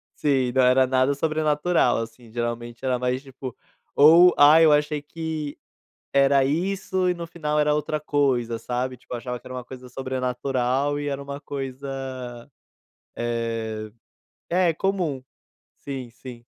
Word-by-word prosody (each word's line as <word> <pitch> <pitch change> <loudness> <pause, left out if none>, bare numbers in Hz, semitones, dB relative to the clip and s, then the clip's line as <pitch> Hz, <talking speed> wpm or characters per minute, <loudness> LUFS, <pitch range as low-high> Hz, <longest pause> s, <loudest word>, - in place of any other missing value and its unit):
Sim, 135 -4 +1
não 130 - +4
era 130 +1 +5
nada 130 +2 +2
sobrenatural, 155 +2 +1
assim, 115 0 -7
geralmente 120 +1 -4
era 125 -1 +1
mais 125 +2 -1
tipo, 130 -2 -8 0.4
ou 170 +5 +7
"Ai, 155 +3 +8
eu 155 - +6
achei 150 0 +2
que 155 -1 -5 0.6
era 140 -1 +4
isso 185 +4 0
e - - +2
no 170 -1 -7
final 150 -3 -2
era 150 0 +3
outra 150 0 -1
coisa 130 -6 0
sabe", 125 +2 -3
tipo 125 - -12
achava 125 +1 -4
que 120 - -21
era 130 - -8
uma 125 -1 -6
coisa 130 0 -11
sobrenatural 130 +2 -1
e 145 0 -3
era 140 0 -3
uma 140 +1 -7
coisa, 135 -2 -6 0.7
eh, 115 -2 -3 0.6
é 175 -1 +3
comum, 180 -8 -1 0.6
sim 135 -3 -6
sim. 120 -1 -11
135 Hz, 145 wpm, -24 LUFS, 125-150 Hz, 0.7 s, Ai